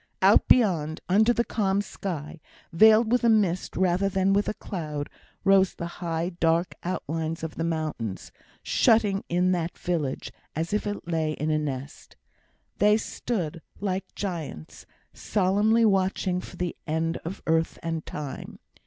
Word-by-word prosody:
Out -, -, +6 dB
beyond, 165 Hz, -10 st, +3 dB
under 215 Hz, +5 st, +4 dB
the 235 Hz, 0 st, +1 dB
calm 200 Hz, -4 st, 0 dB
sky, 170 Hz, -6 st, -5 dB, 0.3 s
veiled 220 Hz, +4 st, +6 dB
with 245 Hz, 0 st, +3 dB
a 235 Hz, -, +5 dB
mist 195 Hz, -5 st, +1 dB
rather 185 Hz, +1 st, +2 dB
than 190 Hz, 0 st, +2 dB
with 205 Hz, +1 st, +2 dB
a -, -, -3 dB
cloud, 150 Hz, -6 st, -5 dB, 0.3 s
rose 195 Hz, -1 st, +4 dB
the 170 Hz, -, -5 dB, 0.2 s
high, 170 Hz, 0 st, -1 dB
dark 165 Hz, 0 st, +2 dB
outlines 165 Hz, -2 st, -3 dB
of 160 Hz, -, -4 dB
the 165 Hz, -, -3 dB
mountains, 155 Hz, -, -3 dB, 0.3 s
shutting 210 Hz, -3 st, +3 dB
in 180 Hz, +1 st, +2 dB
that 170 Hz, -1 st, -2 dB
village 160 Hz, -7 st, -2 dB, 0.2 s
as 165 Hz, +6 st, -2 dB
if 210 Hz, -, 0 dB
it 205 Hz, -4 st, -5 dB
lay 160 Hz, -2 st, 0 dB
in 155 Hz, +1 st, -2 dB
a 155 Hz, -, +2 dB
nest. 140 Hz, -2 st, -6 dB, 0.6 s
They 210 Hz, +1 st, +5 dB
stood, 180 Hz, -8 st, -3 dB, 0.2 s
like 195 Hz, -1 st, -3 dB
giants, 165 Hz, -, -6 dB, 0.3 s
solemnly 210 Hz, +4 st, +2 dB
watching 190 Hz, -2 st, +1 dB
for 180 Hz, -, -11 dB
the 180 Hz, -1 st, -2 dB
end 160 Hz, +1 st, 0 dB
of 170 Hz, +4 st, -7 dB
Earth 160 Hz, 0 st, +1 dB
and 165 Hz, -1 st, -2 dB
Time. 145 Hz, -3 st, -7 dB
180 Hz, 150 wpm, -26 LUFS, 160-200 Hz, 0.6 s, Out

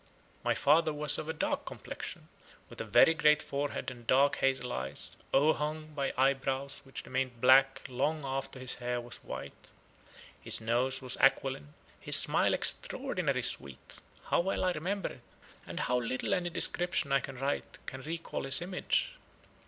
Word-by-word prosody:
My -, -, +1 dB
father 155 Hz, +2 st, +3 dB
was 150 Hz, -1 st, +4 dB
of 155 Hz, -, -6 dB
a -, -, -1 dB
dark 155 Hz, -, -2 dB
complexion, -, -, -8 dB, 0.4 s
with -, -, -7 dB
a -, -, -4 dB
very 120 Hz, +9 st, +6 dB
great 150 Hz, -2 st, +4 dB
forehead 140 Hz, -1 st, -3 dB
and 120 Hz, -2 st, -13 dB
dark 140 Hz, +2 st, +4 dB
hazel 130 Hz, -2 st, 0 dB
eyes, 65 Hz, +1 st, -2 dB, 0.2 s
overhung 155 Hz, +1 st, +1 dB
by 140 Hz, -2 st, -1 dB
eyebrows 135 Hz, +1 st, 0 dB
which 135 Hz, -, -9 dB
remained 130 Hz, -2 st, -3 dB
black 135 Hz, +2 st, +5 dB
long 140 Hz, +4 st, -1 dB
after 135 Hz, 0 st, -4 dB
his 130 Hz, 0 st, -2 dB
hair 125 Hz, 0 st, -3 dB
was 120 Hz, -1 st, -10 dB
white. -, -, -9 dB, 0.7 s
His -, -, 0 dB
nose 120 Hz, +4 st, -1 dB
was 125 Hz, -1 st, -3 dB
aquiline, 135 Hz, -, +1 dB, 0.2 s
his -, -, +5 dB
smile -, -, +5 dB
extraordinary -, -, -2 dB
sweet. 70 Hz, -1 st, -5 dB, 0.2 s
How -, -, +1 dB
well 190 Hz, +3 st, -1 dB
I 185 Hz, -, +2 dB
remember 185 Hz, +5 st, -3 dB
it, -, -, -12 dB, 0.5 s
and -, -, -4 dB
how 125 Hz, -, +1 dB
little 130 Hz, +9 st, -2 dB
any 180 Hz, -2 st, 0 dB
description 175 Hz, -3 st, +1 dB
I 135 Hz, -, +4 dB
can 135 Hz, 0 st, -8 dB
write 135 Hz, +3 st, -3 dB
can 130 Hz, -, -7 dB
recall 165 Hz, -1 st, -5 dB
his 135 Hz, +1 st, +7 dB
image! 185 Hz, -, -1 dB
135 Hz, 160 wpm, -31 LUFS, 130-155 Hz, 0.7 s, his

